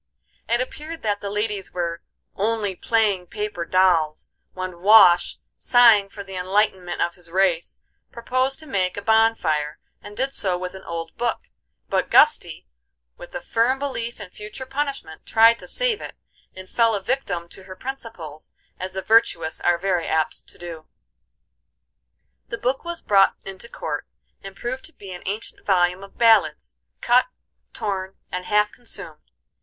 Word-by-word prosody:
It 235 +1 +2
appeared 310 +5 -6
that 205 -2 -1
the 200 - -4
ladies 210 -1 -3
were 170 -1 -3 0.3
"only 210 -1 -1
playing 205 -4 +1
paper 210 -4 -4
dolls," 170 -5 +2 0.2
when 185 -2 -6
Wash, 195 -4 +7 0.2
sighing 230 -5 +6
for 200 0 -8
the 195 -1 -11
enlightenment 185 -1 0
of 175 - -2
his 175 -1 -14
race, 180 -2 0 0.3
proposed 255 +3 0
to - - -12
make 190 -9 -1
a - - -3
bonfire, 200 -10 +2 0.2
and 205 0 -11
did 270 +1 0
so 185 -3 +1
with 180 0 -5
an 190 - -9
old 165 -1 -5
book; 240 -1 -2 0.4
but - - 0
Gusty, - - +4 0.5
with - - -12
a - - -3
firm 240 +4 +1
belief 240 -5 -4
in 200 -3 -9
future 210 +7 -8
punishment, 275 - -4
tried 230 +1 +6
to - - -10
save - - 0
it, - - -8 0.4
and 185 0 -9
fell 230 0 +2
a 200 - -4
victim 205 -8 -2
to 190 - -10
her 185 -1 -9
principles, 185 - -8 0.3
as 185 0 -5
the 190 0 -4
virtuous 170 -8 +2
are 175 -1 +3
very 180 -2 0
apt 160 -1 -1
to - - -13
do. 165 -3 -9 1.6
The 230 - -5
book 255 +3 -1
was 340 0 -5
brought 195 -1 +4
into 195 +4 -8
court, - - -5 0.3
and 195 0 -10
proved 255 +4 -5
to 330 - -6
be 195 -2 -11
an 180 - -8
ancient 210 +3 -5
volume 180 -1 +2
of 195 - -14
ballads, 230 -2 +3 0.3
cut, 245 +1 +4 0.4
torn, 190 -2 -3 0.2
and 180 0 -4
half 210 0 +2
consumed. 245 - -7
200 Hz, 160 wpm, -23 LUFS, 180-230 Hz, 1.6 s, Wash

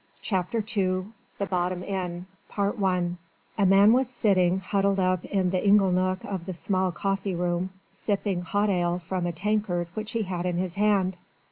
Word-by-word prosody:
CHAPTER 200 +3 -1
II 185 +1 0 0.2
THE 200 - -1
BOTTOM 180 -1 -1
INN 180 -3 -4 0.3
I 195 -3 +1 0.5
A 200 - +4
man 200 +3 +6
was 255 0 +2
sitting, 190 -7 +2
huddled 195 +1 +1
up 185 -1 +1
in 190 -3 0
the 185 -1 0
ingle 200 -2 +5
nook 185 +1 0
of 190 -3 -5
the 185 - -4
small 185 +1 0
coffee 195 +1 -2
room, 175 +1 -1 0.2
sipping 200 -3 -1
hot 205 +4 0
ale 175 -1 +1
from 180 0 -3
a - - -1
tankard 180 -1 -1
which 215 0 -5
he 230 -1 0
had 180 -2 -3
in 175 -1 -1
his 180 -1 -2
hand. 200 -2 +2
185 Hz, 170 wpm, -26 LUFS, 180-200 Hz, 0.5 s, man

